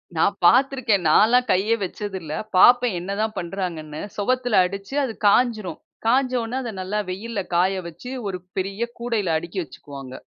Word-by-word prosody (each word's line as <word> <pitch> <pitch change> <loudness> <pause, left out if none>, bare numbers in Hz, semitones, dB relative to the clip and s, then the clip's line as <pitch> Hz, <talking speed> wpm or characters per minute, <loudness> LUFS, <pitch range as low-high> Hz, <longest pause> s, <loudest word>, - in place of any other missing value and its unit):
நான் 200 +5 +2
பார்த்து 270 +8 +5
இருக்கிறேன். 210 -10 +1
நான்லாம் 245 +9 +5
கையே 200 +5 +2
வச்சதில்ல. 190 -5 -5 0.2
பார்ப்பேன் 245 -1 +6
என்ன 195 +3 -4
தான் 220 0 -2
பண்றாங்கன்னு. 170 -4 -5 0.2
சுவத்தில 245 0 +2
அடிச்சு 195 +8 -6
அது 230 - -5
காஞ்சிரும். 215 -5 +2 0.3
காய்ஞ்ச 255 +2 +2
உடனே 235 +3 -4
அத 240 -3 -4
நல்லா 205 +3 -2
வெயில்ல 210 +4 -4 0.2
காய 185 +3 +3
வச்சு 170 +10 -10 0.2
ஒரு 185 - -3 0.2
பெரிய 195 +3 -4 0.2
கூடையில 215 -8 0
அடுக்கி 175 +3 -6
வச்சுக்குவாங்க. 135 -2 -10
200 Hz, 150 wpm, -23 LUFS, 180-235 Hz, 0.3 s, பார்ப்பேன்